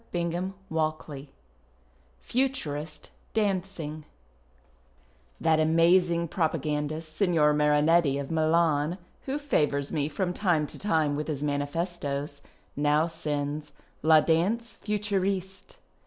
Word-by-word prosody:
2a 175 +2 -1 0.2
1 155 -3 -2 0.9
FUTURIST 155 - -2 0.2
DANCING 185 -7 -1 1.4
That 160 -1 +3
amazing 170 +2 +3
propagandist, 155 -1 -2
Signer 160 -5 +3
Marinctti, 150 0 +3
of 140 +1 -5
Milan, 160 0 +2 0.3
who 270 +2 -1
favours 150 - 0
me 145 -1 0
from 180 +4 -2
time 175 -6 +1
to - - -10
time 160 -7 +1
witli 150 +1 -3
his 150 -2 -3
manifestos, 145 -1 -2 0.3
now 150 +2 +3
sends 150 -2 -4
" - - -36
La 155 0 +6
Uanse 205 +9 +1
Futuriste." 195 -2 -2
160 Hz, 100 wpm, -28 LUFS, 150-180 Hz, 1.4 s, La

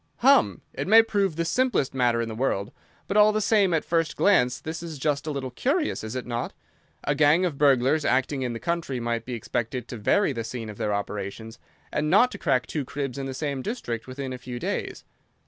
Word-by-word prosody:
"Hum! 275 +3 +4
It - - -4
may 225 +3 +8
prove 200 -6 0
the 170 +1 -1
simplest 245 - +1
matter 120 -3 +2
in - - -4
the 110 - -5
world, 110 -3 -1 0.4
but 200 - 0
all 210 0 +7
the 215 - 0
same 205 -3 +3
at 165 -2 +1
first 165 -2 0
glance 125 -12 +3
this 160 +1 -6
is 165 -3 -7
just 145 +1 -1
a - - 0
little 135 -3 -4
curious, 290 - -1
is 110 +3 -5
it 130 - -3
not? 120 -1 -3 0.5
A 145 - +1
gang 150 +5 +4
of 155 -6 -3
burglars 140 +1 +4
acting 135 +1 +1
in 125 -2 -2
the 115 - -5
country 170 -6 -2
might 115 -1 -2
be 125 - -5
expected 120 +1 -3
to 120 - -6
vary 145 - +2
the 115 -2 -3
scene 115 -1 -6
of 105 - -13
their 105 - 0
operations, 105 +2 -4 0.3
and 150 0 0
not 225 +9 +5
to - - -8
crack 130 -6 +1
two 150 - -3
cribs 140 0 -4
in 135 - -3
the 135 - -5
same 140 -1 -3
district 125 - -4
within 130 0 -5
a 125 - -7
few 125 -1 -7
days. - - -4
135 Hz, 225 wpm, -25 LUFS, 120-170 Hz, 0.5 s, may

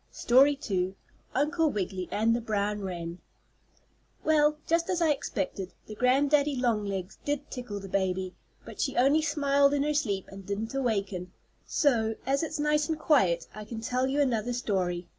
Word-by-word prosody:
STORY 275 +4 +4
II 190 -2 -1 0.4
UNCLE 315 +2 +2
WIGGILY 190 -5 -3
AND 225 +2 +2
THE 240 - -2
BROWN 210 -2 -1
WREN 175 -2 -5 1.0
Well, 300 -1 +3
just 335 +1 +1
as 360 - +1
I 330 -3 +3
expected, 195 -9 -3
the 215 - -8
granddaddy 280 +5 +3
longlegs 210 -6 -1
did 290 0 -3
tickle 245 -6 -5
the 195 - -8
baby, 190 -1 -1 0.3
but - - -7
she - - -1
only 275 +5 +4
smiled 285 -2 +3
in 280 - +1
her 300 +1 0
sleep, 205 -10 -1
and 195 0 -10
didn't 205 +5 -4
awaken, 200 -8 -2 0.4
so, 225 -7 +2
as 275 +1 +1
it's 320 -1 -3
nice 300 +1 +1
and 320 - 0
quiet 195 - +3
I 215 - -7
can 220 +1 -7
tell 250 +3 0
you 275 +2 0
another 245 -3 0
story. 185 -7 -1
240 Hz, 165 wpm, -28 LUFS, 195-290 Hz, 1.0 s, STORY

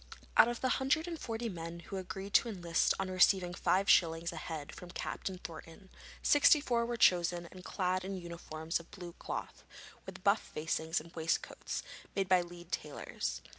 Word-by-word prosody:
Out - - +8
of 240 0 -3
the 260 - +2
hundred 300 +5 +2
and 335 -2 -4
forty 230 -1 -3
men 170 -3 -6
who 195 - -6
agreed 190 +2 -6
to 235 - +5
enlist 175 -5 +1
on 190 -1 -2
receiving 185 -1 +4
five 190 +2 +2
shillings 165 0 +4
a - - -7
head 155 -1 -6
from 180 - -10
Captain 185 +1 -4
Thornton, 170 +1 -10 0.3
sixty 290 +1 +6
four 235 -5 0
were 240 0 -2
chosen 175 -3 +3
and 185 -1 -11
clad 185 -1 -1
in 195 0 -4
uniforms 170 -2 -4
of 170 - -14
blue 175 -3 -9
cloth, - - -5 0.4
with - - -9
buff - - +4
facings 160 +1 -2
and 165 +2 -13
waistcoats, 160 0 -2 0.3
made 195 -1 +1
by 185 -1 +5
Leeds 175 0 -10
tailors. 150 -1 -5
180 Hz, 175 wpm, -33 LUFS, 170-195 Hz, 0.4 s, Out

